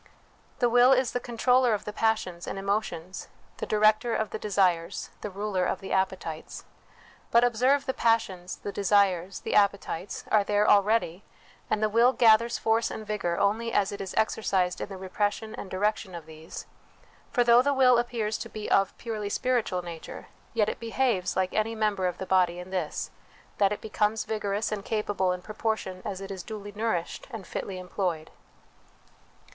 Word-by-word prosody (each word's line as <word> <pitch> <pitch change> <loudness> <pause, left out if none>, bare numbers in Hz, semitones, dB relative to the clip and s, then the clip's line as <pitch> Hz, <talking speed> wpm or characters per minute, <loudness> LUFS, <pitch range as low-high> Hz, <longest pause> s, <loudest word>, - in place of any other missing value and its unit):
The 245 - +3
will 245 +2 +6
is 255 -2 +2
the 245 - -1
controller 245 0 +2
of 205 - -7
the 210 - -5
passions 210 -6 -1
and - - -4
emotions, 195 -3 -3 0.3
the - - -4
director 215 +2 +3
of 220 - -2
the 220 - -4
desires, 185 -4 0
the 210 - -4
ruler 195 -1 -2
of - - -1
the 195 - -8
appetites. 190 -4 -2 0.6
But 235 +1 +5
observe, 250 +4 +3
the 265 - -1
passions, 190 -7 0
the 205 - -6
desires, 195 -2 +2
the - - -3
appetites, 200 -2 0
are 210 -2 +5
there 205 +1 +2
already, 205 -3 +3 0.5
and 215 - 0
the - - +4
will 235 +4 +4
gathers 230 0 +4
force 225 +1 +1
and 220 - -6
vigour 195 -5 -2
only 225 +3 +1
as 200 -4 +1
it 200 - -6
is 195 - -6
exercised 190 -5 +1
in - - -4
the 195 - -7
repression 205 +3 -2
and 190 - -7
direction 195 0 -1
of 170 -2 -8
these; 160 0 -9 0.6
for 245 - +2
though 240 0 +6
the 280 - +1
will 255 -3 +5
appears 230 -3 -2
to - - -6
be 215 -1 -6
of 195 -1 +2
purely 215 -3 -4
spiritual 215 -6 0
nature, 170 -2 -9 0.3
yet 215 -2 +3
it - - -3
behaves 230 -5 0
like 185 -1 0
any 220 +1 0
member 210 -4 0
of 180 - -3
the 190 - -5
body 180 -2 +2
in 180 +1 -8
this 180 -5 -3 0.5
that 200 -1 +4
it 210 - -3
becomes 215 0 0
vigorous 210 0 -2
and 205 -2 -3
capable 205 -4 0
in 180 0 -4
proportion 215 -4 -3
as 195 -2 -5
it 195 0 -7
is 190 -2 -5
duly 205 0 -7
nourished 205 -5 -3
and 225 -7 -7
fitly 190 -2 -5
employed. 180 -3 -3
205 Hz, 180 wpm, -27 LUFS, 185-225 Hz, 0.6 s, will